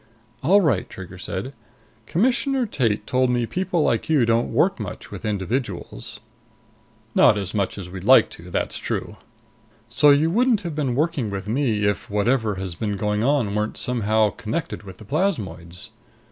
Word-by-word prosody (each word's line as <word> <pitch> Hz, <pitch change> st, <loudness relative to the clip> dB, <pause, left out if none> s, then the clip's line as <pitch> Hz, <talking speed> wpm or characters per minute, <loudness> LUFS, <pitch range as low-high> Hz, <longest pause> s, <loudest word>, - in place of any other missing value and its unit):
"All 195 Hz, +9 st, +5 dB
right," 135 Hz, -, +1 dB
Trigger 90 Hz, -1 st, -10 dB
said. 100 Hz, +8 st, -5 dB, 0.5 s
"Commissioner 245 Hz, -, +1 dB
Tate 115 Hz, -, 0 dB
told 130 Hz, 0 st, +1 dB
me 120 Hz, -1 st, +1 dB
people 180 Hz, +3 st, -1 dB
like 115 Hz, +1 st, 0 dB
you 145 Hz, -7 st, +4 dB
don't 115 Hz, +1 st, +1 dB
work -, -, +2 dB
much -, -, -7 dB
with -, -, -7 dB
individuals." 105 Hz, 0 st, -3 dB, 0.9 s
"Not 105 Hz, -, +5 dB
as 100 Hz, -3 st, -4 dB
much 100 Hz, -2 st, -1 dB
as 95 Hz, -3 st, -6 dB
we'd 90 Hz, 0 st, -8 dB
like -, -, +6 dB
to. -, -, -11 dB
That's -, -, -2 dB
true." -, -, -4 dB, 0.7 s
"So 140 Hz, +5 st, +5 dB
you 145 Hz, +3 st, +4 dB
wouldn't 235 Hz, +1 st, +3 dB
have 170 Hz, -4 st, -5 dB
been 140 Hz, -5 st, -1 dB
working 150 Hz, -5 st, 0 dB
with 100 Hz, 0 st, -5 dB
me 115 Hz, -3 st, 0 dB
if 105 Hz, -2 st, 0 dB
whatever 110 Hz, +1 st, +1 dB
has 95 Hz, -2 st, -5 dB
been 105 Hz, +3 st, -3 dB
going 105 Hz, +1 st, 0 dB
on 130 Hz, -6 st, +1 dB
weren't 105 Hz, +1 st, -2 dB
somehow 110 Hz, -4 st, +1 dB
connected 115 Hz, +9 st, -4 dB
with 95 Hz, -3 st, -11 dB
the 110 Hz, -, -13 dB
plasmoids." 100 Hz, -, -3 dB
115 Hz, 165 wpm, -23 LUFS, 100-150 Hz, 0.9 s, like